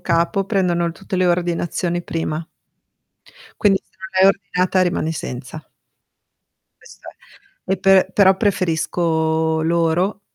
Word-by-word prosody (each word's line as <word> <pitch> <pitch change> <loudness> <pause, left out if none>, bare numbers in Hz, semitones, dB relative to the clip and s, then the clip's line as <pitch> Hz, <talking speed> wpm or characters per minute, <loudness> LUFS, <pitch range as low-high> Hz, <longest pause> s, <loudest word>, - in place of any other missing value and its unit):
capo 170 +3 0
prendono 175 -4 0
tutte 185 - -6
le 185 0 +2
ordinazioni 175 0 -1
prima. 160 -1 -4 1.1
Quindi 195 -2 +4
se - - -39
non 190 0 -8
l'hai - - +8
ordinata 185 -1 -1
rimani 175 -3 0
senza. 130 0 -7 1.2
Questo - - -15 0.4
è. 390 - -7
E - - +1
pe 190 0 +4
però 190 -2 +5
preferisco 160 -4 0
loro 170 +4 0
175 Hz, 115 wpm, -20 LUFS, 165-190 Hz, 1.2 s, l'hai